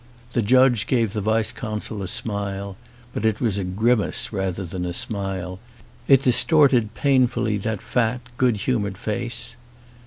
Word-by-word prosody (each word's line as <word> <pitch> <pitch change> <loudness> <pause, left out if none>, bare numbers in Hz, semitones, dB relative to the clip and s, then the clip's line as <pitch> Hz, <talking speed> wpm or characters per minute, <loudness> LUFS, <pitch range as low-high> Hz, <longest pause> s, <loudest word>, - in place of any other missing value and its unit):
The 120 - +2
judge 125 0 +4
gave 115 -5 +1
the 105 - -2
vice 110 +2 +1
consul 110 -2 -5
a 95 - -4
smile, 100 -1 -3 0.4
but - - -3
it 110 -1 +1
was 105 -5 0
a - - -1
grimace 110 +5 0
rather 95 -1 -2
than 90 +1 -5
a 90 -1 -3
smile; 95 -3 -3 0.5
it 135 -1 +6
distorted 125 -4 +4
.painfully 125 -5 +2
that 110 0 -3
fat 125 0 0 0.2
good 125 -3 +3
humoured 105 -3 -1
face. 115 +2 -3
110 Hz, 150 wpm, -23 LUFS, 100-120 Hz, 0.5 s, it